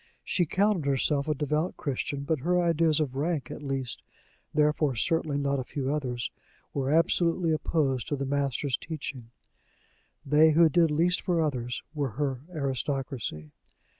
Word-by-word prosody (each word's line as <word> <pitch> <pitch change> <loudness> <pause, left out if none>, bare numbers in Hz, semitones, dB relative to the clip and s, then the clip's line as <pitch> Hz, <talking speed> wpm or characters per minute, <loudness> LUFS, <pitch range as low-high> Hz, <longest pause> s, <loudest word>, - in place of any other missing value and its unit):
She 175 -3 0
counted 195 -4 +1
herself 140 +1 +1
a 155 - +1
devout 150 +4 -1
Christian, 140 0 -3
but 155 +1 0
her 180 +6 +2
ideas 165 -2 +3
of 145 -5 -1
rank, 145 -2 -1
at - - -7
least 135 -3 -3 0.5
therefore 150 -2 +2
certainly 150 +5 0
not 140 -1 0
a - - -2
few 135 +2 -2
others 125 -5 -2 0.4
were 135 -1 -1
absolutely 165 +2 +2
opposed 140 -5 0
to 145 - -1
the 140 0 -3
Master's 140 -1 0
teaching: 140 -7 -6 1.0
they 150 +2 +5
who 165 +1 +6
did 165 +2 +4
least 170 +4 +2
for 175 -3 0
others 125 -6 -1
were 140 -7 -2
her 135 -1 -2
aristocracy. 135 - -3
145 Hz, 150 wpm, -28 LUFS, 135-160 Hz, 1.0 s, who